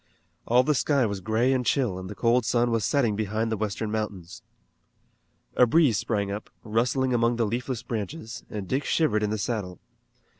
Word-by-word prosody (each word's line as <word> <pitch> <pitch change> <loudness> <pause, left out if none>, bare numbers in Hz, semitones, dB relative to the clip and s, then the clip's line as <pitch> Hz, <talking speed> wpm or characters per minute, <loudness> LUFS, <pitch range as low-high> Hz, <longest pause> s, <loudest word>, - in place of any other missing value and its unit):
All 125 +2 +5
the 150 +3 +2
sky 140 -1 +2
was 100 -3 -3
gray 110 +6 +2
and 130 -1 0
chill 120 -8 0
and 95 0 -7
the 105 - -7
cold 120 +3 +2
sun 120 +2 +1
was 115 -2 +1
setting 120 -3 +1
behind 110 +2 -1
the - - +1
western 105 0 -3
mountains. 100 -5 -4 1.1
A 125 - +5
breeze 140 -7 +4
sprang 100 -3 -1
up, 105 +1 -6
rustling 125 +4 +1
among 120 0 +2
the 115 -1 +1
leafless 120 +2 -3
branches, 115 +1 -5
and 100 -3 -5
Dick 135 +7 0
shivered 110 -10 +1
in 105 - 0
the 110 - -1
saddle. 100 -4 -3
115 Hz, 185 wpm, -26 LUFS, 105-125 Hz, 1.1 s, All